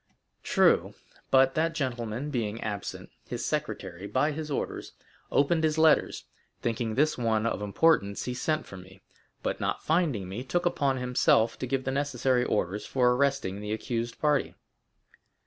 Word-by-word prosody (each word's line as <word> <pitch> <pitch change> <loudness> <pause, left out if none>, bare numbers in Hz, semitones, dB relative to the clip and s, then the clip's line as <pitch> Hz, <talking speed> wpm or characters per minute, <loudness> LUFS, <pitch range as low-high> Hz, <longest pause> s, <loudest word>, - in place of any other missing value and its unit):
0093m - - -42
"True; - - +3 0.4
but 135 0 +5
that 165 +1 0
gentleman 125 -1 -3
being 115 -4 -2
absent, 100 -2 -5 0.2
his 120 0 -4
secretary, 100 - -3
by 130 +9 +1
his 155 +1 -5
orders, 140 - -4 0.4
opened 160 +3 +2
his 155 0 +1
letters; 160 -1 +3 0.3
thinking 115 -1 -2
this 150 0 +2
one 110 -2 +1
of 115 - -1
importance, 100 -1 +2
he 125 - -3
sent 155 +5 -1
for 95 - -10
me, 95 +1 -14 0.4
but - - -2
not - - -2
finding 150 - +1
me, 100 +7 -5
took 175 +7 -1
upon 140 -6 +1
himself 125 -2 +2
to 130 - -3
give 135 +1 -1
the 130 - -2
necessary 130 -2 +1
orders 105 -3 -1
for 125 -2 +2
arresting 135 -7 0
the 105 0 -3
accused 115 +1 -3
party." 150 -2 +1
125 Hz, 160 wpm, -28 LUFS, 110-145 Hz, 0.4 s, but